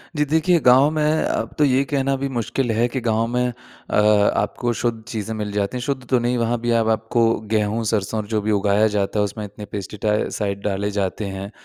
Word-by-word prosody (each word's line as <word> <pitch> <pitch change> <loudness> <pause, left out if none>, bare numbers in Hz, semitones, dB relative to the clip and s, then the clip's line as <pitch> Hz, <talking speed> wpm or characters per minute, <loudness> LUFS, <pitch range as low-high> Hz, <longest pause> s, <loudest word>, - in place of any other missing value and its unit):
जी 150 0 +1
देखिए, 160 +4 +2
गाँव 130 +1 +5
में 155 0 +1
अब - - -2
तो 150 - +3
ये 135 0 +3
कहना 135 -1 0
भी 140 +1 -2
मुश्किल 120 0 -1
है 115 +2 +2
कि 130 +2 -3
गाँव 115 -1 +1
में 125 +1 0
अ, 125 +1 -7 0.4
आपको 120 -1 -1
शुद्ध 115 -1 -2
चीज़ें 110 -2 -4
मिल 105 -1 -4
जाती 100 +4 -1
हैं। - - -4
शुद्ध 130 -2 -3
तो 130 - +3
नहीं, 120 +1 0
वहाँ 115 0 0
भी 120 - 0
अब 115 -1 +2
आपको 110 +1 +1 0.3
गेहूँ-सरसों 110 0 0
और 105 - -10
जो 110 -1 -1
भी 110 +1 -1
उगाया 100 +1 +3
जाता 105 0 -1
है, 105 - +3
उसमें 105 +2 -6
इतने 105 +1 -9
पेस्टिसाइड 100 0 -2
डाले 100 0 -1
जाते 100 +1 -2
हैं, 95 +1 -6
115 Hz, 210 wpm, -21 LUFS, 105-125 Hz, 0.4 s, गाँव